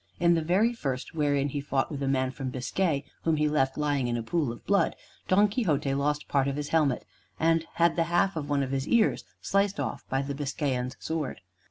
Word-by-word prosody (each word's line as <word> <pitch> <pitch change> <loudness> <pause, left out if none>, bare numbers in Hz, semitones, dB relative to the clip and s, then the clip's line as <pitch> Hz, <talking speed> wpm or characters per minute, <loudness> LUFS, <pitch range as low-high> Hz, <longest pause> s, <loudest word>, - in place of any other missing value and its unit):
In 170 +1 +5
the 165 - +2
very 195 +9 +2
first, 135 - -4
wherein 145 -2 +1
he 145 +1 -3
fought 140 0 -1
with 140 -2 -4
a 135 - 0
man 130 -1 +1
from 130 -1 -5
Biscay, 140 +4 -1 0.2
whom 165 -1 +2
he 150 0 +2
left 135 -3 +1
lying 145 -4 +1
in 120 0 -1
a 115 - -3
pool 145 +1 0
of 120 - -11
blood, 200 -5 +2 0.3
Don 205 +3 +5
Quixote 155 - 0
lost 150 +2 0
part 140 -1 +2
of 140 - -1
his 145 0 -4
helmet, 150 -6 +2 0.3
and 165 0 +3
had 170 0 +3
the 165 - +2
half 175 +3 +2
of 145 -2 -4
one 140 -1 +2
of 130 - -4
his 135 0 -1
ears 235 -2 +2 0.2
sliced 200 0 +1
off - - -3
by 135 +1 0
the 140 +1 -3
Biscayan's 135 -2 -2
sword. 160 -4 -3
145 Hz, 220 wpm, -28 LUFS, 135-165 Hz, 0.3 s, In